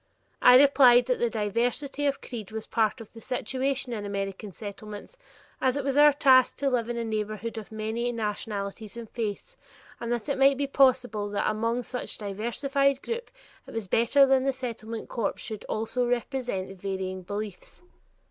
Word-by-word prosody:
I 250 Hz, -, +8 dB
replied 260 Hz, -3 st, +6 dB
that 250 Hz, 0 st, 0 dB
this 240 Hz, -, +2 dB
diversity 240 Hz, +7 st, -1 dB
of 280 Hz, -, -1 dB
creed 220 Hz, -6 st, -7 dB
was 220 Hz, 0 st, -5 dB
part 225 Hz, +1 st, 0 dB
of 220 Hz, -, -13 dB
the 225 Hz, -, -11 dB
situation 260 Hz, +1 st, -2 dB
in 210 Hz, -3 st, -4 dB
American 200 Hz, 0 st, -4 dB
Settlements, 210 Hz, -, -9 dB, 0.5 s
as 260 Hz, +1 st, +2 dB
it 285 Hz, -, -2 dB
was 275 Hz, 0 st, -1 dB
our 295 Hz, +1 st, +8 dB
task 260 Hz, -3 st, +5 dB
to 275 Hz, 0 st, 0 dB
live 240 Hz, -2 st, 0 dB
in 240 Hz, -, -2 dB
a 235 Hz, -, -1 dB
neighborhood 215 Hz, +1 st, -3 dB
of 215 Hz, -, -12 dB
many 220 Hz, +3 st, -2 dB
nationalities 210 Hz, -1 st, -4 dB
and 230 Hz, -1 st, -7 dB
faiths, 230 Hz, -, -5 dB, 0.4 s
and 235 Hz, 0 st, -4 dB
that 240 Hz, +1 st, -2 dB
it 280 Hz, -2 st, -1 dB
might 275 Hz, 0 st, +5 dB
be 280 Hz, -, 0 dB
possible 255 Hz, -6 st, +2 dB
that 205 Hz, -, -1 dB
among 230 Hz, +3 st, 0 dB
such 250 Hz, +1 st, -4 dB
diversified 265 Hz, +7 st, 0 dB
people 475 Hz, +1 st, -4 dB, 0.4 s
it -, -, -10 dB
was 225 Hz, -4 st, -3 dB
better 235 Hz, +8 st, +5 dB
that 265 Hz, -1 st, +3 dB
the 270 Hz, 0 st, +1 dB
Settlement 230 Hz, -3 st, -6 dB
corps 235 Hz, -, -2 dB
should 215 Hz, -2 st, -7 dB
also 240 Hz, +3 st, -1 dB
represent 240 Hz, -6 st, -2 dB
varying 190 Hz, -1 st, -3 dB
religious 185 Hz, -1 st, -12 dB
beliefs. 205 Hz, -, -6 dB
235 Hz, 175 wpm, -27 LUFS, 215-265 Hz, 0.5 s, I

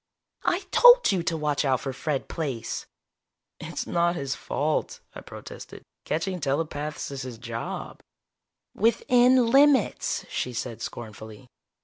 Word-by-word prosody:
"I 360 Hz, -, +2 dB
told -, -, +7 dB
you 190 Hz, -3 st, +1 dB
to 165 Hz, -1 st, -1 dB
watch 150 Hz, -1 st, 0 dB
out 130 Hz, -3 st, +1 dB
for 135 Hz, -, -4 dB
Fred 140 Hz, +1 st, -3 dB
Plaice!" 135 Hz, -8 st, -4 dB, 0.7 s
"It's -, -, -5 dB
not 170 Hz, 0 st, +1 dB
his 140 Hz, -4 st, -2 dB
fault," 150 Hz, +2 st, -2 dB
I -, -, -9 dB
protested. -, -, -10 dB, 0.2 s
"Catching 180 Hz, +4 st, -2 dB
telepaths 150 Hz, 0 st, -3 dB
is 135 Hz, -1 st, -5 dB
his 125 Hz, -3 st, -7 dB
job." 115 Hz, 0 st, -6 dB, 0.7 s
"Within 245 Hz, +2 st, +4 dB
limits," 275 Hz, -4 st, +3 dB
she 125 Hz, -, -3 dB
said 120 Hz, -1 st, -5 dB
scornfully. 110 Hz, +2 st, -8 dB
150 Hz, 125 wpm, -26 LUFS, 130-195 Hz, 0.7 s, told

